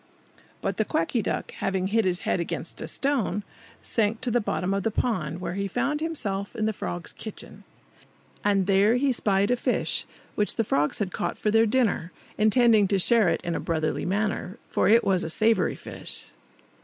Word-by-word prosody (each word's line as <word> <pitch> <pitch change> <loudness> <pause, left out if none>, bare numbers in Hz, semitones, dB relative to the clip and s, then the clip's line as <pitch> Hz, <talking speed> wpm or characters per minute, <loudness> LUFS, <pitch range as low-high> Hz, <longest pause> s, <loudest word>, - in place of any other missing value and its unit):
But 195 -1 -1
the 220 - +2
Quacky 210 +4 0
Duck, 195 - -3
having 190 -1 -2
hit 225 0 +2
his 180 -1 +1
head - - 0
against 170 - -4
a - - -4
stone, 240 -8 -1 0.4
sank 225 0 0
to 245 - -1
the 240 +1 +2
bottom 190 -2 -1
of 195 - 0
the 225 - 0
pond, 180 - -1
where 180 - -4
he 200 +1 -2
found 270 +9 -1
himself 205 -12 -3
in 215 - -1
the 220 - 0
frogs' 90 - -5
kitchen. - - -9 0.8
And 200 -2 +2
there 200 +4 +4
he 270 +2 +2
spied 200 -3 +1
a - - +4
fish, 240 - -1 0.3
which 210 - 0
the 225 - +1
frogs 150 -7 +1
had 195 -4 -2
caught - - -2
for 210 - 0
their 225 +1 +4
dinner, 215 -7 +1 0.2
intending 215 -1 +4
to 195 - +1
share 215 0 +5
it - - 0
in 170 -1 -2
a - - -2
brotherly 155 -2 -1
manner, 205 +1 -1
for - - +2
it 225 +3 +6
was 185 -2 +2
a - - -3
savoury 220 +6 +2
fish. - - -8
205 Hz, 190 wpm, -26 LUFS, 185-225 Hz, 0.8 s, it